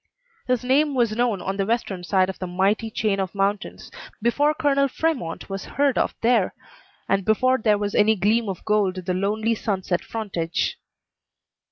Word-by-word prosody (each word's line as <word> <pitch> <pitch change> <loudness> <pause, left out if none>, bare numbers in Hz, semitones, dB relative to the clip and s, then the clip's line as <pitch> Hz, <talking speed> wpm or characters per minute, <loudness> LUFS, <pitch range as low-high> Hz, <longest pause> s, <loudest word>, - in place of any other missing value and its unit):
His 250 -2 +1
name 280 +3 +2
was 235 -4 +1
known 230 -6 0
on 195 +1 -3
the 195 - 0
western 215 -6 -1
side 185 0 +2
of 190 - -6
the 185 - -4
mighty 195 +5 0
chain 215 -2 0
of 190 0 -3
mountains 200 +1 -2 0.3
before 285 +7 +2
Colonel 280 -2 +2
Fremont 270 - -2
was 195 -1 -5
heard 280 -2 +3
of - - 0
there, 230 -5 +2 0.5
and 195 0 +1
before 255 +5 +2
there 215 -2 +3
was 205 0 -3
any 215 +1 +4
gleam 215 +3 +1
of 190 - -6
gold 205 -3 +1
on 185 - -5
the 180 - -1
lonely 215 +4 0
sunset 190 -5 -2
frontage. 185 -7 -3
210 Hz, 175 wpm, -23 LUFS, 195-240 Hz, 0.5 s, any